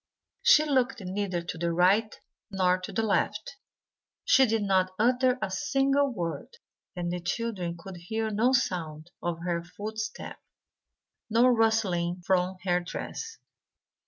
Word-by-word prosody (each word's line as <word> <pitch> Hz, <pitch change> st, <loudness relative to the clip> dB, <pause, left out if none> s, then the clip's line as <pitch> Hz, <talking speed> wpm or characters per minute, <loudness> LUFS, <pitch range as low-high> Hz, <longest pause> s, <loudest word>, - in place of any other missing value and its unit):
She 480 Hz, -11 st, +6 dB
looked 265 Hz, -3 st, +1 dB
neither 185 Hz, -2 st, -3 dB
to 165 Hz, -, -6 dB
the 170 Hz, 0 st, 0 dB
right 195 Hz, +6 st, +2 dB, 0.3 s
nor 185 Hz, -2 st, +2 dB
to 185 Hz, -, -7 dB
the 225 Hz, -, -1 dB
left. 210 Hz, -, -1 dB, 0.7 s
She 265 Hz, -1 st, +5 dB
did 220 Hz, -1 st, 0 dB
not 190 Hz, -2 st, +2 dB
utter 250 Hz, +3 st, +3 dB
a 190 Hz, -, -2 dB
single 275 Hz, +8 st, +1 dB
word; 175 Hz, -, -5 dB, 0.4 s
and 175 Hz, -1 st, -3 dB
the 180 Hz, -, -3 dB
children 180 Hz, -1 st, -3 dB
could 180 Hz, +2 st, -10 dB
hear 220 Hz, +6 st, -3 dB
no 225 Hz, +5 st, +2 dB
sound 170 Hz, -10 st, -1 dB
of 170 Hz, -1 st, -3 dB
her 170 Hz, -1 st, -1 dB
footstep, 215 Hz, +5 st, -6 dB, 0.9 s
no 230 Hz, +3 st, +4 dB
rustling 205 Hz, -7 st, +1 dB
from 185 Hz, 0 st, +1 dB
her 180 Hz, -1 st, +2 dB
dress. 450 Hz, -, -6 dB
195 Hz, 135 wpm, -28 LUFS, 175-230 Hz, 0.9 s, She